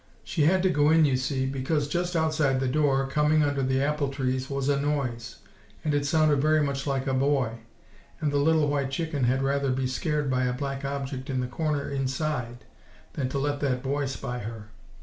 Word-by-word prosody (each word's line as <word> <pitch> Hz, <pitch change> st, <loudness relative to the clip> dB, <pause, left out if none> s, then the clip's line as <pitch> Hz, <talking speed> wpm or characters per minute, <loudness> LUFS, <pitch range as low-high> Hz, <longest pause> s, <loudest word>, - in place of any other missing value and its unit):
She 155 Hz, -4 st, 0 dB
had 185 Hz, +3 st, +3 dB
to 190 Hz, -, +4 dB
go 145 Hz, -2 st, +3 dB
in 160 Hz, 0 st, +5 dB
you 135 Hz, -3 st, +2 dB
see, 130 Hz, +1 st, -1 dB
because 140 Hz, +3 st, -1 dB
just 175 Hz, +3 st, -2 dB
outside 155 Hz, -4 st, +2 dB
the 135 Hz, -, 0 dB
door, 135 Hz, 0 st, +2 dB
coming 150 Hz, +2 st, +2 dB
under 145 Hz, -1 st, 0 dB
the 130 Hz, +1 st, +1 dB
apple 150 Hz, -1 st, 0 dB
trees, 130 Hz, -1 st, -2 dB
was 140 Hz, -1 st, -2 dB
a 140 Hz, -1 st, +2 dB
noise, 125 Hz, -5 st, -2 dB, 0.5 s
and 150 Hz, -, 0 dB
it 145 Hz, 0 st, +1 dB
sounded 150 Hz, -2 st, +3 dB
very 155 Hz, 0 st, +3 dB
much 140 Hz, 0 st, -2 dB
like 135 Hz, -1 st, -1 dB
a 135 Hz, -, 0 dB
boy; 130 Hz, -4 st, +1 dB, 0.6 s
and 150 Hz, -2 st, 0 dB
the 145 Hz, -, +1 dB
little 155 Hz, +1 st, +3 dB
white 140 Hz, -2 st, 0 dB
chicken 145 Hz, -2 st, -1 dB
had 130 Hz, +2 st, +1 dB
rather 140 Hz, 0 st, +1 dB
be 130 Hz, 0 st, -1 dB
scared 150 Hz, +3 st, -1 dB
by 130 Hz, -1 st, +1 dB
a 125 Hz, -, 0 dB
black 135 Hz, +1 st, -4 dB
object 135 Hz, -1 st, -4 dB
in 130 Hz, -1 st, -1 dB
the 125 Hz, -, -1 dB
corner 145 Hz, +3 st, -2 dB
inside, 130 Hz, -3 st, -3 dB, 0.5 s
than 130 Hz, -3 st, -2 dB
to 140 Hz, -, -3 dB
let 145 Hz, +1 st, -1 dB
that 130 Hz, -3 st, -1 dB
boy 140 Hz, +1 st, -1 dB
spy 125 Hz, -2 st, -4 dB
her. 110 Hz, -1 st, -7 dB
140 Hz, 210 wpm, -27 LUFS, 130-150 Hz, 0.6 s, in